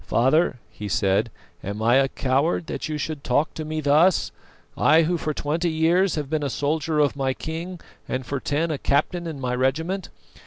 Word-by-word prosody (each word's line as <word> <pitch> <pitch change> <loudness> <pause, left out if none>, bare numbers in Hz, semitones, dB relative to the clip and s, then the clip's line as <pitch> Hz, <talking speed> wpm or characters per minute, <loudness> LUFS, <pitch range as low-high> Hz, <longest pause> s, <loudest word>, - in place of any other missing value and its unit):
"Father," 135 +4 +2
he 105 - -7
said, 100 +3 +1 0.3
"am 100 +2 -4
I 115 +3 +4
a 135 0 +4
coward 140 +6 0
that - - -5
you 155 - -2
should 150 -1 -4
talk 145 +5 +1
to 160 - -5
me 155 0 -3
thus? 155 +5 +3 0.4
I, 160 +1 +5
who 175 +3 +1
for 155 -2 -2
twenty 155 +4 -1
years 165 +4 +2
have 150 -3 -3
been 155 +1 -1
a 145 - -1
soldier 155 +3 -1
of 145 -2 +2
my 135 -2 -1
king 170 +3 -6 0.3
and 130 0 -3
for 140 +3 -3
ten 155 +5 -1
a 145 - -3
captain 170 +5 0
in 155 -4 -6
my 125 -1 -2
regiment? 160 +10 -1
150 Hz, 195 wpm, -24 LUFS, 135-160 Hz, 0.4 s, I